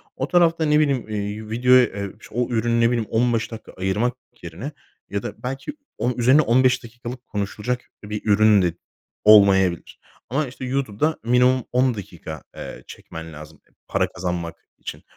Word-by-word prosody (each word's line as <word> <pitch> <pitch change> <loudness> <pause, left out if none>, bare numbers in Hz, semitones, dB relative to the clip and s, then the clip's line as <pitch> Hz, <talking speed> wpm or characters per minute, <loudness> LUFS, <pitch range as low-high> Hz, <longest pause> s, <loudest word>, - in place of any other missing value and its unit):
O 130 - -2
tarafta, 165 -2 +3
ne 150 0 +4
bileyim, 140 -7 +1
iii, 105 +1 -4
videoya, 125 +3 +5
eee, 100 -1 -5
ş - - -14
o 125 0 0
ürüne, 115 0 +1
ne 115 - +5
bileyim, 115 -3 -1
15 115 0 +1
dakika 115 -1 -9
ayırmak 100 +6 0 0.3
yerine 90 - -6 0.4
ya 100 0 -3
da - - -7
belki 135 - -4 0.2
onun 125 0 -1
üzerine 130 +5 +5
15 130 -1 +3
dakikalık 120 +2 -9
konuşulacak 105 +4 -3 0.2
bir 105 0 -5
ürün 105 -1 +5
de 90 -2 +1 0.5
olmayabilir 95 -5 +5 0.3
ama, 140 +4 0
işte, 130 +1 -8
YouTube'da 135 +3 -1
minimum 125 +2 +3
10 125 0 +2
dakika, 85 -6 -8
eee, - - -8
çekmen 80 0 -9
lazım, 75 +1 -12
eee, - - -33
para - - +1
kazanmak 85 -2 -4 0.2
için. - - -8
115 Hz, 160 wpm, -22 LUFS, 100-125 Hz, 0.5 s, videoya